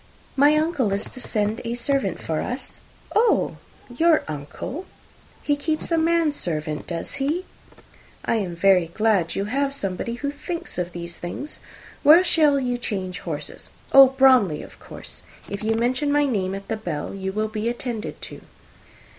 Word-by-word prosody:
"My 290 +2 +5
uncle 305 - +1
is 200 +2 0
to 255 - -9
send 215 -1 -1
a 235 +1 -2
servant 245 -7 0
for 160 -1 -2
us." 250 +1 -5 0.4
"Oh! 445 +1 +3 0.3
Your 320 +6 +3
uncle! 155 - -6 0.6
He 290 - +2
keeps 310 +3 -2
a 330 - +3
man 330 -2 +2
servant, 155 - -2
does 170 -1 -5
he? 320 +7 0 0.8
I 230 - +2
am 185 -5 -3
very 180 -1 +4
glad 210 -6 +2
you 195 - -1
have 275 +5 0
somebody 200 0 -3
who 280 +3 -3
thinks 335 - -6
of 175 0 -3
those 170 0 -7
things. 280 +12 -6 0.4
Where 315 +5 +8
shall 300 -5 +4
you 245 -2 -1
change 190 -5 -3
horses? - - -6 0.2
Oh, 275 0 +10
Bromley, 255 - +4
of - - -14
course. - - -10 0.3
If 200 +1 -5
you 225 +1 +1
mention 250 +5 +1
my 290 0 +3
name 195 -7 -1
at 195 0 -8
the 225 - -2
Bell, 170 -9 -4
you 190 -1 -3
will 215 +2 -1
be 215 +1 -2
attended 240 -2 -5
to." - - -7
235 Hz, 165 wpm, -23 LUFS, 190-285 Hz, 0.8 s, Oh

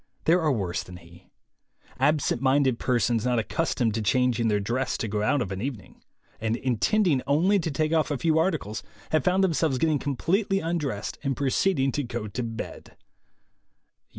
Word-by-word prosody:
There 175 +2 +4
are 155 -2 +2
worse 95 -8 -1
than 90 -1 -11
he. 85 +1 -17 0.7
Absent 150 -5 +1
minded 130 -2 +2
persons, 120 -3 +1
not 125 -1 +1
accustomed 115 -1 0
to 110 - -1
changing 120 +1 +2
their 105 -2 +2
dress 120 +6 -1
to 115 - -3
go 105 0 -2
out 130 +5 +2
of 100 - -7
an 95 0 -4
evening, 125 -6 -6 0.4
and 110 0 0
intending 135 - +1
only 175 +8 +3
to 165 - -2
take 155 +2 0
off 160 -1 +2
a 145 - -1
few 160 +2 +2
articles, 140 - -1 0.3
have 155 -3 +2
found 185 +1 +2
themselves 160 -6 +1
get 135 - +1
ting 155 -3 +1
completely 195 - 0
undressed, 150 - -3
and 135 -3 -2
proceeding 135 +1 +1
to 145 - -1
go 120 -4 -4
to 105 +5 -4
bed. 115 -2 -7
130 Hz, 180 wpm, -26 LUFS, 115-160 Hz, 0.7 s, There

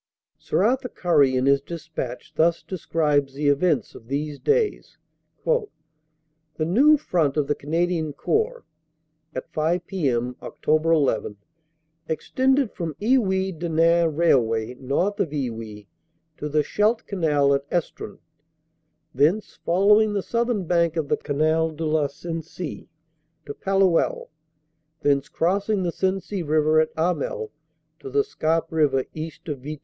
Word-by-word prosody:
Sir - - 0
Arthur 250 +3 +1
Currie 145 - +2
in 130 - +1
his 140 0 +4
despatch 150 -6 -6
thus 170 +1 +2
describes 150 -6 0
the 145 0 +1
events 145 - +1
of 115 - -13
these 145 +2 -3
days: 440 -1 0 0.5
"The 155 - -5
new 275 - +5
Front 160 - 0
of 150 - +2
the 145 - +1
Canadian 160 +1 -1
Corps 450 - -1 0.7
(at 130 - -6
5 165 +3 0
p.m. 125 -10 -1
Oct. - - -11
1 155 0 +4 0.2
1 105 - -8 0.4
) 160 0 -47
extended 265 - +1
from 165 -4 -5
Iwuy 190 -7 +1
Denain 170 0 +3
Railway, 120 -8 +2
north 140 +11 -1
of 165 - +1
Iwuy, 115 -7 -5 0.5
to 150 - -4
the 150 0 +2
Scheldt 215 +8 +1
Canal 150 -7 +2
at 140 0 -1
Estrun, 175 -3 -3 1.0
thence 160 +11 +1
following 210 +4 +4
the 200 -2 -1
southern 235 -4 -1
bank 170 -1 +1
of 150 -3 -1
the - - +2
Canal 155 +2 +1
de 160 +1 -5
la 155 -1 +1
Sensee 165 +3 -7 0.6
to - - -6
Palluel, 195 -2 +1 0.7
thence 140 -1 +1
crossing 195 +3 0
the 175 - -1
Sensee 190 +1 -2
River 155 0 +3
at 155 0 +2
Hamel 440 - -1 0.5
to 405 - -8
the 420 +1 +2
Scarpe 165 - -1
River 145 -5 +2
east 160 0 -7
of 145 -4 -4
Vitry. 150 +3 -7
160 Hz, 135 wpm, -24 LUFS, 145-190 Hz, 1.0 s, new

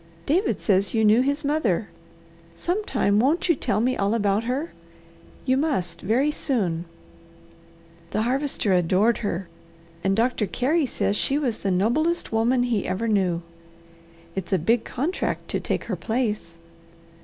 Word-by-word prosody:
David 365 +8 +1
says 195 +1 +2
you 220 -1 +3
knew 215 +3 +5
his 285 +3 -1
mother. 240 - 0 0.7
Sometime 310 - 0
won't 315 - +2
you 340 - +5
tell 215 -7 -1
me 255 +3 +1
all 200 +3 +1
about 205 0 +1
her? 270 +7 -2 0.7
You 260 0 +2
must 260 - -1
very 255 +9 +2
soon. 190 - -1 1.2
The 215 - 0
Harvester 260 -4 0
adored 185 +6 +3
her, 190 -4 -3 0.6
and 195 0 +2
Doctor 230 -1 +1
Carey 285 - +1
says 205 - -1
she 275 +6 0
was 250 -7 -1
the 200 - -1
noblest 240 - +1
woman 240 +3 +2
he 235 -5 0
ever 190 +5 -1
knew. 185 -5 +1 0.9
It's 190 -1 -5
a 190 - +4
big 225 +8 +1
contract 315 +9 -2
to - - 0
take - - -2
her - - -3
place. 215 -8 -2
230 Hz, 145 wpm, -24 LUFS, 195-275 Hz, 1.2 s, knew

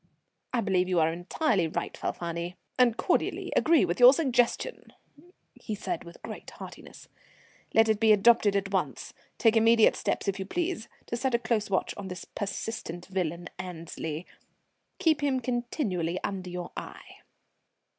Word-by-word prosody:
"I 240 - +1
believe 185 -3 +1
you 180 -2 +3
are 160 0 +3
entirely 180 - 0
right, 160 - -4
Falfani, 170 +1 -4 0.2
and 240 -3 +4
cordially - - 0
agree 320 - +5
with 175 0 -2
your 250 +1 +10
suggestion," 265 - 0 0.6
he 215 - -6
said 180 -4 -4
with 170 - -12
great - - -8
heartiness. - - -11 0.7
"Let 225 0 +6
it 220 -1 +2
be 220 -1 +5
adopted 210 -1 +5
at 195 0 -1
once. 190 - -2 0.2
Take 225 -2 +4
immediate 225 0 +5
steps, - - -2
if 195 0 -1
you 190 - -3
please, 345 - -2 0.2
to - - -3
set 255 0 0
a - - +5
close 225 -3 -1
watch 190 - 0
on 200 -1 -6
this 180 -2 -7
pestilent 195 -3 -5
villain 175 -2 -2
Annesley; 165 -2 -5 0.7
keep 320 -5 +2
him 275 -3 +1
continually 235 - -2
under 185 -2 -3
your 180 0 -5
eye." - - -9
200 Hz, 155 wpm, -28 LUFS, 180-235 Hz, 0.7 s, your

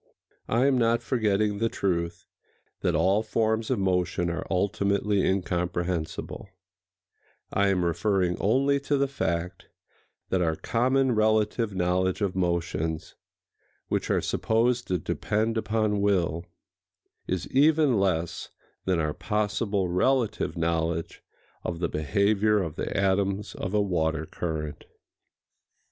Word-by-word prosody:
—I 120 +3 +3
am 135 -2 +3
not 115 0 +2
forgetting 105 -4 +1
the 115 +1 +1
truth 85 -4 -2 0.5
that - - 0
all 100 +3 +3
forms 110 0 0
of - - +1
motion 90 -2 0
are 85 - -4
ultimately 100 +1 +1
incomprehensible: 90 -2 -2 1.0
I 100 0 +3
am 95 -3 +1
referring 90 +1 +1
only 140 +7 +3
to 145 +1 0
the 140 0 +2
fact 85 -8 -3 0.6
that 95 - +1
our 80 -2 +1
common 130 +7 +1
relative 110 0 +1
knowledge 90 0 +1
of 100 -3 0
motions, 85 -3 -1 0.8
which - - -1
are - - +2
supposed 120 +2 +1
to 90 - +1
depend 110 +7 -1
upon 110 -2 0
will, 90 -5 +1 0.8
is 90 -1 -2
even 145 -3 +4
less 85 -4 -1 0.4
than 90 -3 +1
our 75 -1 0
possible 105 -2 -1
relative 110 +3 +1
knowledge 80 0 -1 0.4
of 85 - -3
the 85 0 -1
behavior 105 +6 +2
of 80 -4 -5
the - - -3
atoms 100 +1 0
of 100 +1 -4
a 105 - +4
water 80 -5 0
current. 75 -3 -5
100 Hz, 125 wpm, -27 LUFS, 85-110 Hz, 1.0 s, even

